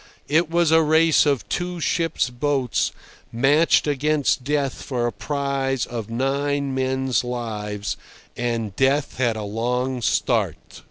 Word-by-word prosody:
It 160 +2 +2
was 170 -1 +2
a 160 0 +6
race 160 0 +4
of 140 -4 0
two 175 0 -3
ship's 165 -5 0
boats 130 -1 0 0.4
matched 145 +7 +3
against 145 -2 +1
Death 140 -1 -1
for 125 -3 -2
a 120 - 0
prize 140 -3 -2
of 115 -3 -6
nine 140 +3 -1
men's 130 -3 0
lives, 105 -5 -4 0.4
and 115 -4 -2
Death 135 +3 +1
had 120 -3 +2
a 110 - -4
long 125 +4 -2
start. - - +1
135 Hz, 130 wpm, -23 LUFS, 120-145 Hz, 0.4 s, a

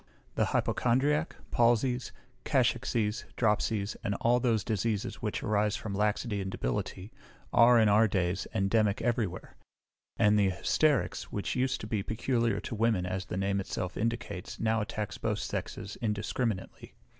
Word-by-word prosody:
The - - +2
hypochondriac, 145 +6 +1 0.2
palsies, 120 +1 +2 0.3
cachexies, 105 -2 +1
dropsies, 105 -2 +1
and 100 - -1
all 120 +3 +2
those 115 -4 +1
diseases 110 -1 -2
which 105 -2 -2
arise 105 0 +1
from 105 - -5
laxity 105 +1 0
and 95 - -3
debility, 95 - -3 0.4
are, 120 0 +7
in 110 - +5
our 105 +2 +5
days, 90 -2 -1
endemic 100 +1 +2
every 120 -3 +1
where; 90 +1 -10 0.6
and 105 0 +4
the 100 -2 +4
hysterics, 135 - +1
which 100 - -2
used 130 0 0
to - - -5
be 110 -2 -1
peculiar 115 0 0
to - - -7
the 110 -2 -4
women, 110 -6 +2
as 95 +1 -3
the 90 - -4
name 100 +1 0
itself 95 -1 -4
indicates, 115 -5 -3
now 110 0 +1
attacks 105 0 -4
both - - -1
sexes 100 - -5
indiscriminately. 105 -1 -3
105 Hz, 150 wpm, -30 LUFS, 100-115 Hz, 0.6 s, are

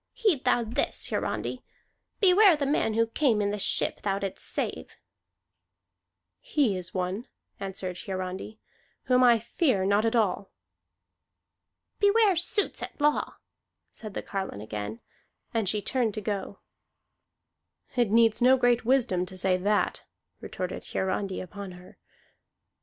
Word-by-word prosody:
"Heed 420 - +1
thou 240 - +3
this, 225 +1 -1
Hiarandi. - - -2 0.6
Beware 390 -1 +6
the 290 -2 -2
man 270 -6 +1
who 230 0 +3
came 230 -1 +1
in 205 -1 0
the 210 - -3
ship - - +1
thou 195 -1 0
didst 195 -1 -4
save!" - - -4 1.4
"He 290 - +1
is 185 -1 -6
one," 185 +6 -3 0.3
answered 190 -2 -5
Hiarandi, 190 +2 -5 0.5
"whom 255 0 +3
I 240 -2 +6
fear 230 - 0
not 200 +2 +3
at 225 +1 +1
all." 200 -3 +1 1.5
"Beware 410 -1 +4
suits 360 +5 0
at - - -7
law," 295 +1 +1 0.6
said 215 -3 -9
the - - -3
carline 190 - -4
again, 105 +1 -6 0.5
and 220 -5 0
she 210 0 -1
turned 240 -6 0
to 215 - -3
go. 200 -1 -4 1.4
"It 240 -4 +2
needs 225 0 +4
no 255 +2 +6
great 245 -1 +2
wisdom 225 -8 +1
to 185 - -10
say 185 0 +2
that," 205 +3 0 0.4
retorted 185 -1 -5
Hiarandi 190 0 -2
upon 195 +1 -8
her. 180 +1 -15
215 Hz, 135 wpm, -27 LUFS, 190-255 Hz, 1.5 s, Beware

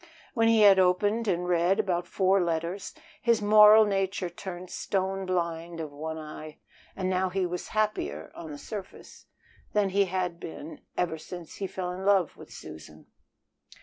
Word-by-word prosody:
When 225 -3 +3
he 225 -1 +5
had 200 -2 +7
opened 205 +5 +2
and 180 -2 0
read 180 +3 +2
about 180 -4 0
four 190 -1 +2
letters, 170 +3 -3 0.3
his 235 -2 +3
moral 210 +1 +7
nature 195 -2 -1
turned 180 0 -8
stone 190 0 -2
blind 170 -2 -2
of 155 -2 -5
one 160 +2 -5
eye. 155 0 -9 0.4
And 190 -1 -2
now 185 0 +1
he 190 0 -1
was 180 0 -4
happier 80 - -1
(on 160 - -9
the 145 - -7
surface) 195 +4 -9 0.5
than 205 -2 +2
he 200 +1 +3
had 180 -2 -2
been 160 -1 -9 0.2
ever 165 -3 -1
since 170 +1 -9
he 195 - -3
fell 185 -1 -4
in 185 +1 -6
love 195 -4 +3
with - - -14
Susan. 75 0 -11
185 Hz, 165 wpm, -28 LUFS, 170-195 Hz, 0.5 s, had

